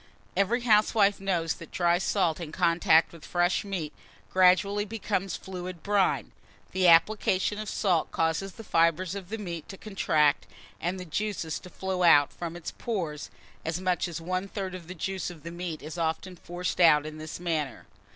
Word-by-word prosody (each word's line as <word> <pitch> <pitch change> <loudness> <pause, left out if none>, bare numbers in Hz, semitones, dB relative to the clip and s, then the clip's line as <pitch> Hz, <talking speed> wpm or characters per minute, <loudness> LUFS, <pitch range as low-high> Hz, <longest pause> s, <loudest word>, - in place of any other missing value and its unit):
Every 220 +5 +2
housewife 210 -3 +4
knows 175 -4 0
that 165 - -11
dry 175 0 +2
salt 185 -4 +1
in 165 -3 -6
contact 170 -1 +3
with 165 - -13
fresh 175 +2 +1
meat 185 -7 -4 0.4
gradually 190 +2 +4
becomes 195 -3 -2
fluid 180 -2 -7
brine. 200 -2 +1 0.4
The 185 -1 +2
application 190 +3 +4
of 215 -1 -4
salt 180 -6 +1
causes 165 +4 -1
the 225 - -10
fibres 170 0 +2
of 195 -3 -7
the 225 - -3
meat 170 -6 -6
to 195 - -8
contract, 155 -8 +1 0.3
and 180 +3 -2
the 180 - -6
juice 205 +5 -2 0.2
to 180 - -12
flow 190 0 -3
out 145 -5 +6
from 170 -1 -6
its 175 -2 -6
pores: 170 -10 -4 0.3
as 165 +2 -2
much 185 0 0
as 170 -1 -5
one 185 +3 -2
third 195 -2 -5
of 180 -3 -8
the 185 - -7
juice 190 +1 -3
of 170 -4 -12
the 170 - -6
meat 170 -3 -5
is 160 +3 -6
often 165 +3 -2
forced 175 +1 -4
out 155 -4 +6
in 155 0 -7
this 155 +2 -7
manner. 155 -7 -2
180 Hz, 180 wpm, -28 LUFS, 165-195 Hz, 0.4 s, out